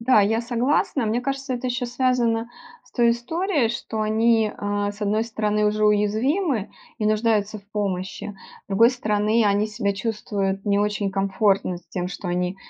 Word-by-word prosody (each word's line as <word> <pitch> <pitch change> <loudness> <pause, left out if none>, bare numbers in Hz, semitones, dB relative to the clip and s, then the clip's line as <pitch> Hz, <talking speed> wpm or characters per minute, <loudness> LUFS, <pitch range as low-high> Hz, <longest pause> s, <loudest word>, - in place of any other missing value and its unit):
Да, 230 -2 +5
я 220 +3 +2
согласна. 245 +1 0
Мне 225 +3 0
кажется, 270 0 -3
это 245 +1 -4
еще 245 0 -2
связано 240 -2 0 0.3
с - - -25
той 235 -2 +3
историей, 290 - 0
что 225 -1 -3
они, 220 0 +2
э, 205 0 -2
с 205 - -16
одной 210 +2 +1
стороны, 210 -2 0
уже 215 0 +1
уязвимы 220 - +1 0.3
и 210 - 0
нуждаются 215 -1 +1
в 200 - -19
помощи. 195 -1 -3 0.3
С - - -61
другой 225 +4 +5
стороны, 215 -2 +1
они 205 +1 +2
себя 210 -2 -2
чувствуют 195 -2 -2
не 200 0 +2
очень 205 -1 0
комфортно 195 -1 +1
с 175 - -25
тем, 180 -1 -3
что 185 0 -6
они, 180 +1 -1
215 Hz, 170 wpm, -23 LUFS, 205-235 Hz, 0.3 s, Да